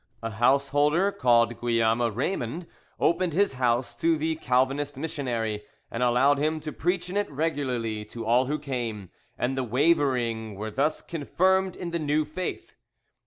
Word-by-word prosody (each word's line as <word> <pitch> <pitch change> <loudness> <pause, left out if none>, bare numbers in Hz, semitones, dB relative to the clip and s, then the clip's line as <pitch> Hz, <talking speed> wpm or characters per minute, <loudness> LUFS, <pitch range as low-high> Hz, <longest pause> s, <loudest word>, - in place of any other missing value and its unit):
A 115 - -3
householder 145 - +3
called 120 - +2
Guillaume 115 -1 +2
Raymond 120 - -2 0.3
opened 170 -1 +2
his 200 -2 +2
house 120 0 +1
to 165 +2 +2
the 160 +1 -1
Calvinist 135 +1 0
missionary, 120 -8 -2 0.3
and 115 - -3
allowed 125 +4 +4
him 155 +2 0
to 155 0 -5
preach 180 +2 -1
in 180 - -6
it 205 0 0
regularly 130 -8 -2
to 115 +2 -8
all 120 +3 +3
who 150 +2 0
came, 120 - -4 0.3
and 125 +2 -1
the 130 - -1
wavering 125 -5 +1
were 110 +2 -5
thus 145 +7 0
confirmed 185 +4 +1
in 175 -2 -5
the 170 - -1
new 150 0 +1
faith. 165 +5 -5
135 Hz, 155 wpm, -26 LUFS, 120-160 Hz, 0.3 s, allowed